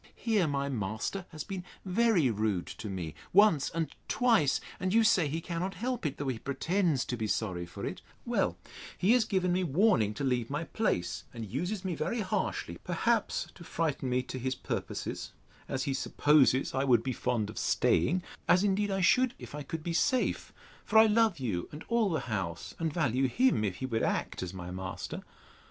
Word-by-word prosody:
Here 215 -7 +1
my 140 -1 -1
master 115 - -3
has 155 -3 -6
been 190 -2 -5 0.2
very 190 - +3
rude 105 -4 0
to 110 - -7
me, 90 -5 -4 0.2
once 195 -7 +5
and 165 -2 -3
twice; 225 - +3 0.2
and 185 0 -1
you 225 +2 +5
say 190 -8 +4
he 155 +3 -2
cannot 180 +3 -3
help 240 -3 -2
it, 140 - -5
though 140 -2 -2
he 120 -4 -3
pretends 160 - 0
to 125 - -2
be 110 -2 -2
sorry 90 -5 -2
for 85 - -7
it: - - -5 0.2
Well, - - 0 0.4
he 190 - +3
has 245 -2 +5
given 185 -4 +1
me 185 +1 +1
warning 155 - +3
to 140 - -4
leave 125 -4 0
my 150 +3 -2
place, 165 - -1
and 115 -1 -5
uses 180 - -3
me 185 - -1
very 230 +7 -1
harshly; 195 0 -2
perhaps 215 +5 0
to 175 - -12
frighten 155 -6 -1
me 125 0 +1
to 130 - -6
his 130 +1 -1
purposes, - - -4 0.4
as 130 -1 -1
he 140 - -1
supposes 140 -1 +3
I 135 +1 +1
would 120 -4 +4
be 130 - -1
fond 110 -3 -1
of - - -6
staying 175 - +2 0.2
(as 180 +2 +5
indeed 205 +1 +1
I 195 -1 0
should, 245 +8 +4
if - - -10
I 150 - -5
could 155 +3 -5
be 170 - -2
safe; 255 +9 +1 0.3
for 220 - +2
I 220 - +9
love 220 -3 +3
you 105 - -3
and 150 +2 -8
all 235 -3 +3
the 160 - 0
house, 90 -6 -4
and 165 -1 0
value 135 -5 +1
him, 250 - +2
if 95 -4 -1
he 130 - -4
would 115 -3 -1
act - - -1
as 90 -1 -4
my 90 -2 -7
master). 95 0 -5
155 Hz, 200 wpm, -30 LUFS, 120-195 Hz, 0.4 s, I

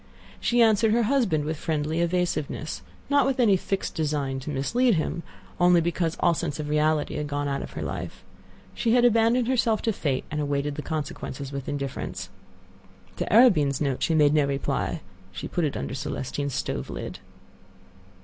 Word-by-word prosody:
She 240 0 +3
answered 220 -1 +4
her 235 +1 +3
husband 215 - +1
with 155 0 -2
friendly 155 +1 -1
evasiveness,—not 175 - -1
with 270 -1 0
any 220 -5 +5
fixed 195 +1 -2
design 145 -4 -1
to 135 - -7
mislead 220 - +2
him, 160 +1 -1 0.4
only 175 0 +6
because 165 0 -1
all 170 - +4
sense 160 -2 -3
of 150 -1 -4
reality 150 0 +1
had 150 - -2
gone 145 0 -2
out 140 -1 -1
of - - -8
her - - -4
life; - - -6 0.5
she 230 -1 +1
had 245 0 +5
abandoned 230 +1 +3
herself 235 -4 +2
to 225 - +1
Fate, 140 -8 -1
and 150 0 -1
awaited 145 0 -1
the 150 - -5
consequences 145 -3 -5
with 140 -1 -5
indifference. 140 -2 -4 0.9
To - - -3
Arobin's 160 - +5
note 140 -4 -1
she 165 - +2
made 150 -2 +5
no 150 -2 +3
reply. 140 -1 -2 0.3
She 95 0 -6
put 175 -3 -1
it 145 - -2
under - - -4
Celestine's 135 +1 -3
stove - - -3
lid. - - -6
155 Hz, 170 wpm, -26 LUFS, 145-215 Hz, 0.9 s, only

